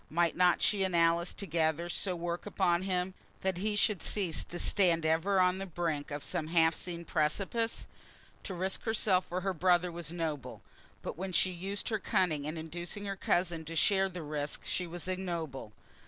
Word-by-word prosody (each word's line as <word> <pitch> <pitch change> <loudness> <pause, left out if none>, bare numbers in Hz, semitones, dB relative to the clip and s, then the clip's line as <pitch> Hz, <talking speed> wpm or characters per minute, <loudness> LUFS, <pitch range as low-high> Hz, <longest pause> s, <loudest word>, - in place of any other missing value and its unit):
Might 170 +1 +2
not 180 -1 +4
she 205 -2 +3
and 185 -2 0
Alice 170 +1 +3
together 165 -3 0
so 180 +1 0
work 175 +2 -3
upon 180 -4 +2
him, 185 -1 -1 0.3
that 190 -2 -1
he 210 +2 0
should 210 -3 +2
cease 185 -6 0
to 175 - -6
stand 175 -4 +3
ever 165 +5 +2
on 180 +1 +3
the 195 - -4
brink 160 -4 -2
of 145 -1 -4
some 170 -4 -1
half 165 0 +4
seen 170 -1 -6
precipice? 195 +10 0 0.6
To 190 - -4
risk 190 +2 -1
herself 205 -5 +2
for 180 +1 -2
her 195 +1 0
brother 175 +1 +3
was 170 -2 -5
noble. 160 -5 -4 0.4
But - - -5
when 190 0 -3
she 185 +3 +3
used 190 +3 -3
her 215 -2 0
cunning 160 -6 +1
in 155 +2 -3
inducing 175 +5 -4
her 195 -1 -2
cousin 175 -3 0
to 165 +1 -6
share 195 +3 +3
that 180 -2 -6
risk 150 -1 -3
she 180 - -1
was 175 +2 -3
ignoble. 170 - -3
175 Hz, 185 wpm, -32 LUFS, 165-190 Hz, 0.6 s, not